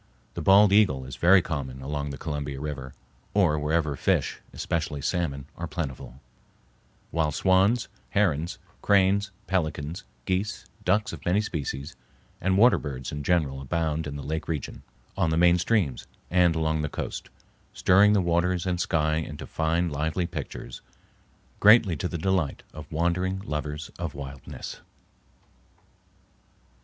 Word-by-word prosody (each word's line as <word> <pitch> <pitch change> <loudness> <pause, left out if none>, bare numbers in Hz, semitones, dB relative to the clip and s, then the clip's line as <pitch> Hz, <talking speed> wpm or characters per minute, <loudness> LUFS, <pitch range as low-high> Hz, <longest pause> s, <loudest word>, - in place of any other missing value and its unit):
The - - -5
bald 100 +1 +6
eagle 75 -12 +4
is 65 - -7
very 90 +1 +5
common 65 -6 -4
along 70 +1 -3
the 70 - -6
Columbia 70 -3 -4
River, 70 -3 -6 0.4
or 85 -7 +3
wherever 75 0 0
fish, - - 0
especially 80 -3 -2
salmon, 70 -2 -2
are 85 - -5
plentiful, 70 -5 -5 0.9
while 80 -2 +1
swans, 95 - +3 0.2
herons, 85 -2 +1 0.2
cranes, 100 0 +3 0.2
pelicans, 85 -1 -2 0.2
geese, 95 +2 -2 0.2
ducks 105 +3 +2
of - - -8
many 90 +4 +2
species, 70 -8 -4 0.5
and 95 +1 +2
water 120 +5 +6
birds 65 -3 -5
in 75 - -4
general 70 -4 +1
abound 80 +2 -1
in 70 - -5
the 70 - -6
lake 80 +1 -3
region, 80 -5 -4 0.3
on 90 -4 +1
the 80 - +1
main 90 +1 +5
streams, 90 - 0 0.2
and 90 -2 +4
along 80 -1 0
the 75 - -2
coast, - - -5 0.4
stirring 100 +3 +5
the 100 - +4
waters 85 +1 +1
and 90 -1 0
sky 80 -2 +1
into 75 -2 -5
fine, 80 +2 0
lively 80 +3 -1
pictures, - - -7 0.8
greatly 105 -4 +6
to 85 - -2
the 85 - -4
delight 90 -3 0
of 75 -1 -10
wandering 85 +4 0
lovers 75 -2 -4
of 85 -5 -4
wildness. 70 -2 -8
80 Hz, 140 wpm, -26 LUFS, 75-90 Hz, 0.9 s, bald